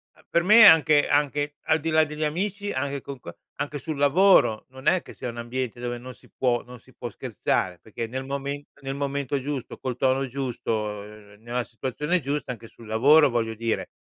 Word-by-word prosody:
uhm, - - -23
per 170 - +2
me 220 +4 +8
anche 155 -4 +7
anche, 145 0 +1
al 155 0 +3
di 165 +2 -3
là 160 0 +5
degli 150 +1 -5
amici 200 +6 -2
anche 140 +1 -2
con 140 -1 -8
qua 85 -8 -9 0.3
anche 145 +1 -3
sul 150 +2 -5
lavoro, 145 - +4
non 130 +1 -13
è 185 - +4
che - - -13
sia - - -5
un 120 - -8
ambiente 120 0 -4
dove 120 0 -3
non 125 +1 -9
si - - -22
può 125 -2 0
non 125 0 -12
si - - -22
può - - -6
scherzare 90 -2 -2
perché 110 +4 -6
nel 130 +3 -4
mome 140 +1 -4 0.2
nel 135 0 -4
momento 140 0 -2
giusto, 140 -2 -5
col 125 -2 -4
tono 135 +1 +1
giusto, 130 -2 -4
uhm, 105 -1 -6
nella 120 +2 -3
situazione 140 +9 -2
giusta, 140 -1 -3
anche 115 -2 -9
sul 115 0 -15
lavoro, 140 +7 +5
voglio 115 -2 -1
dire, 115 0 -2
135 Hz, 205 wpm, -25 LUFS, 120-150 Hz, 0.3 s, me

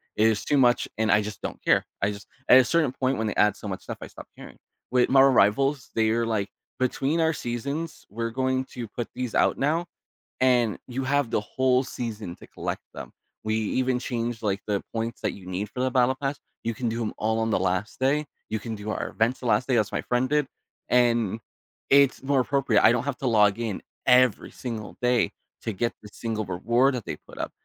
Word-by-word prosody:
It 110 - +4
is 110 -2 0
too 145 - +2
much, 125 -2 +4
and 110 -2 +2
I 105 - +5
just 105 0 -7
don't - - -6
care. - - +4 0.2
I 100 +1 +2
just 100 0 -10 0.2
at 130 - +9
a - - +6
certain 155 -3 +2
point, 130 0 0
when 110 - -1
they 105 - -2
add 105 -1 +3
so - - -8
much 95 -2 -4
stuff, - - -6
I - - -6
stop - - -12
caring. - - -11 0.4
With 125 -1 +3
Marvel 135 0 +6
Rivals, 135 +6 +3
they're 115 +1 +2
like, 110 -3 -1 0.3
"Between 135 +5 0
our 160 0 +3
seasons, 140 +6 -4
we're 115 +3 -3
going 130 +1 0
to 120 -2 -5
put 120 +2 -5
these 125 -3 -3
out - - +3
now, 160 +5 +1 0.6
and 125 -4 +3
you 130 +1 -3
have 140 -3 +1
the - - +2
whole 130 +4 +1
season 110 -8 -5
to - - -15
collect - - -5
them. - - -9 0.3
We 110 0 +1
even 125 +4 0
changed, 120 -2 -3
like, 100 -1 0
the 100 -2 0
points 115 +1 -3
that - - 0
you 95 - -12
need 95 +3 -4
for 125 - -8
the 130 - +2
battle 125 +1 +3
pass, 140 0 -1 0.3
you 115 - 0
can 120 +1 -2
do 115 +1 -3
'em 110 - -2
all 110 +1 0
on 115 0 0
the - - +2
last 95 +2 -1
day. 145 +3 +2 0.2
You 110 - -2
can 110 +1 -5
do 105 0 -7
our - - -2
events 115 +4 0
the - - -9
last 115 +1 +2
day," 125 - +3
as 105 -2 +1
my - - 0
friend 125 +1 0
did, 150 -1 +2 0.4
and 115 -4 +2 0.5
it's 140 -1 +5
more 135 -1 +2
appropriate. 130 -4 +2
I - - +8
don't 120 -1 +1
have 140 -2 -2
to 135 - -2
log 105 -3 +4
in 110 -5 -3 0.3
every 125 -3 +4
single 115 -4 -6
day 125 -1 +2 0.3
to 110 - -2
get 120 +5 -1
the 105 - -12
single 110 -2 -3
reward 120 +9 +2
that 120 - -5
they - - -4
put - - -16
up. - - -3
120 Hz, 225 wpm, -26 LUFS, 110-130 Hz, 0.6 s, at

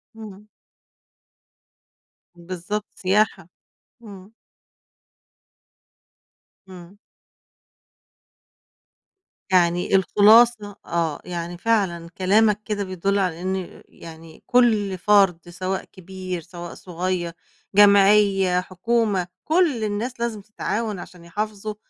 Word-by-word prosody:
امم. 210 -2 -11 1.9
بالضبط، 185 +4 -5
سياحة، 195 -2 0 0.5
امم. 200 -1 -13 2.3
امم. 185 +1 -13 2.5
يعني 175 0 +2
الخلاصة 210 +2 +4
آه، 165 -3 -2
يعني 175 0 -5
فعلًا 180 -5 -1
كلامك 210 +2 +2
كده 210 -2 -2
بيدُلّ 195 +1 -1
على 180 -3 -2
إن 185 -1 -5
يعني 160 -1 -14
كُلّ 215 -6 +2
فرد 180 -3 +2
سواء 185 +2 -4
كبير 185 -1 -7
سواء 175 +1 -9
صغيّر، 180 -1 -4 0.4
جمعية، 200 -2 +5
حكومة، 195 0 -1 0.2
كُلّ 315 -8 +1
الناس 215 +4 -3
لازم 235 -3 -3
تتعاون 215 0 -4
عشان 175 -1 -12
يحافظوا 210 +3 -5
195 Hz, 80 wpm, -22 LUFS, 175-210 Hz, 2.5 s, جمعية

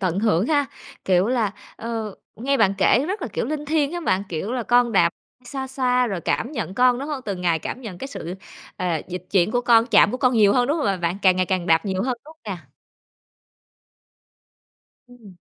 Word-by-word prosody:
tận 185 -2 0
hưởng 210 -2 +2
ha, 290 -2 +2 0.4
kiểu 185 0 +3
là, 230 -5 0 0.2
ờ, 225 -3 -4 0.2
nghe 275 +5 0
bạn 195 -6 +3
kể 260 - +4
rất 395 0 -3
là, 255 - -3
kiểu, - - -1
linh 300 +2 -3
thiêng 300 0 0
hén 350 -1 -4
bạn, 185 -6 +1
kiểu, 180 +7 -4
là 250 -1 -1
con 240 0 +3
đạp, 175 -4 +5 0.4
xoa 265 +1 -5
xoa 250 -1 +1
rồi 195 -6 -3
cảm 235 - -1
nhận 190 -9 -4
con, 250 +1 +4
đúng 280 +3 -5
hông? 295 -3 -3
Từng 195 -3 -4
ngày 170 -2 +1
cảm 255 - -6
nhận 205 -7 -8
cái 270 - -6
sự, 180 - -6 0.4
ờ, 180 - -3 0.2
dịch 180 0 -6
chuyển 185 -1 +3
của 245 - +1
con, 235 -1 +4
chạm 210 -3 +5
của 250 - -2
con 255 -1 +2
nhiều 210 -3 +5
hơn, 245 +1 +2
đúng 295 +4 +1
hông, 300 - -1
à, 195 -1 +1
bạn? 175 +1 -2
Càng 185 -2 +5
ngày 185 0 +1
càng 185 -2 -1
đạp 165 0 +3
nhiều 190 -2 -1
hơn, 255 0 -1
đúng 310 - -13
hông 320 - -34 0.2
nè? 170 - -16 2.4
Ừm. 230 -7 -16
230 Hz, 225 wpm, -22 LUFS, 185-260 Hz, 2.4 s, đạp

